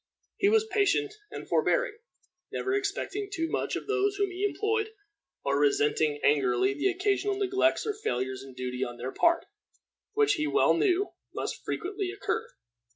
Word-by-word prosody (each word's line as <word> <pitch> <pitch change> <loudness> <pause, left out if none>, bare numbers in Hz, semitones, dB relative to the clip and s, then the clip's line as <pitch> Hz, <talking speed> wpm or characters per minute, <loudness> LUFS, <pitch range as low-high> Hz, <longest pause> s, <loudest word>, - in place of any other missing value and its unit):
He 400 - +4
was 440 0 +4
patient 415 0 +1 0.2
and - - -8
forbearing, - - +2 0.6
never 390 - -1
expecting 405 0 -2
too 330 -5 -1
much - - -1
of - - -4
those 405 -1 +1
whom 400 -1 0
he 370 +2 -4
employed, 435 +1 0 0.6
or 140 0 +2
resenting 145 +1 +2
angrily 130 -3 +3
the 145 - +1
occasional 395 +2 +1
neglects 385 -4 +2
or 430 - 0
failures 130 - -2
in 135 -1 -11
duty 125 0 -3
on 120 0 -5
their 125 +2 -4
part, 340 0 +3 0.7
which 425 -1 +4
he 305 -5 0
well 410 - +4
knew 390 0 +2 0.2
must - - -4
frequently 390 +1 -3
occur. 400 +2 -2
390 Hz, 155 wpm, -29 LUFS, -, 0.7 s, He